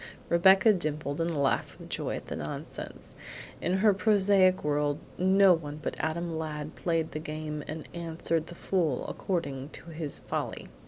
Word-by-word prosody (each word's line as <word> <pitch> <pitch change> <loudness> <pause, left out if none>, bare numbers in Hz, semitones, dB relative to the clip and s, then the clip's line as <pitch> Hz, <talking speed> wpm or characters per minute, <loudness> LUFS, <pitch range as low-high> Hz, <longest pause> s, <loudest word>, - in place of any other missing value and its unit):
Rebecca 190 +5 +6
dimpled 150 -4 -2
and 165 - +1
laughed 140 -4 0
with - - -11
joy - - -2
at - - -7
the - - -5
nonsense. - - -3 0.5
In 180 - 0
her 210 - +7
prosaic 195 -2 +4
world 145 -1 +1 0.2
no 190 +1 +6
one 150 -3 -4
but 155 - -3
Adam 165 0 -2
Ladd 155 -1 -5
played 165 -2 0
the 155 - -4
game 155 -1 -5
and 155 0 -6
answered 165 -1 -2
the 175 - -9
fool 170 -8 0
according 140 -7 -3
to 170 - -10
his 155 -2 -4
folly. - - -4
165 Hz, 160 wpm, -29 LUFS, 150-185 Hz, 0.5 s, her